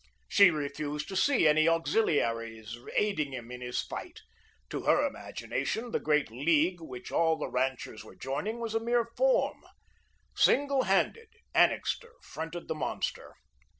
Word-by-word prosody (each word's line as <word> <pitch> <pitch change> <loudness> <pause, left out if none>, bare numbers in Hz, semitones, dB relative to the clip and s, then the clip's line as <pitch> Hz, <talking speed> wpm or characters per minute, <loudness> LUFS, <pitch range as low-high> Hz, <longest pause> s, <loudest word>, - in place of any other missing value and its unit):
She 200 -2 +7
refused 150 -1 -3
to 195 - -5
see 210 - +4
any 155 +1 +4
auxiliaries 115 - 0 0.2
aiding 155 -10 +1
him 120 -2 -7
in 125 0 -7
his 125 0 -2
fight. - - -8 0.5
To - - -3
her - - +4
imagination, 220 - -3
the - - 0
great 150 -5 +1
League, 160 +7 +2
which 125 -6 -8
all 165 -1 +3
the - - -3
ranchers 130 -3 -2
were - - -14
joining, 150 - -3
was 230 -2 -3
a 225 - +2
mere 235 +1 +1
form. - - +2 0.7
Single 280 -1 +3
handed, 460 -1 +1 0.2
Annixter 465 -1 +2
fronted 165 +2 -6
the - - -1
monster. 155 - -4
160 Hz, 145 wpm, -30 LUFS, 135-220 Hz, 0.7 s, She